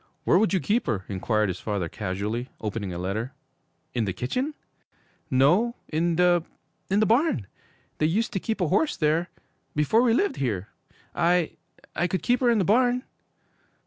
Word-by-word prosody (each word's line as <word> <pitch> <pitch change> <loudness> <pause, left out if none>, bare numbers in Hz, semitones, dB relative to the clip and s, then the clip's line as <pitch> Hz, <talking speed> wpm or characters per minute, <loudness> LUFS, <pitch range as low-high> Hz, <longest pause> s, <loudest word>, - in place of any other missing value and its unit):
'Where 175 - +4
would 220 - +2
you 190 - +2
keep 220 +4 0
her?' 100 -7 -1
inquired 105 +2 0
his 90 - -4
father 100 -5 -2
casually, 105 +6 -3
opening 105 -2 -3
a 85 - -5
letter. 105 +8 -3 0.6
'In 120 -3 0
the 95 - -2
kitchen?' 255 - -2 0.7
'No, 175 - +3
in 165 +2 +1
the 175 -1 +4 0.5
in 200 +2 +3
the - - +4
barn! 230 - +2 0.5
They 155 - +3
used 225 +8 0
to 195 - 0
keep 220 +1 -3
a 175 - +1
horse 295 - +1
there 160 +3 +1 0.5
before 150 +10 +3
we 235 -2 +3
lived 400 +8 +1
here! 105 -8 -2 0.4
I 175 -1 +2 0.4
I 175 - +1
could 185 +2 -2
keep 245 0 +2
her 250 - +3
in 235 - +4
the 195 - +2
barn!' 245 +4 +3
170 Hz, 175 wpm, -26 LUFS, -, 0.7 s, Where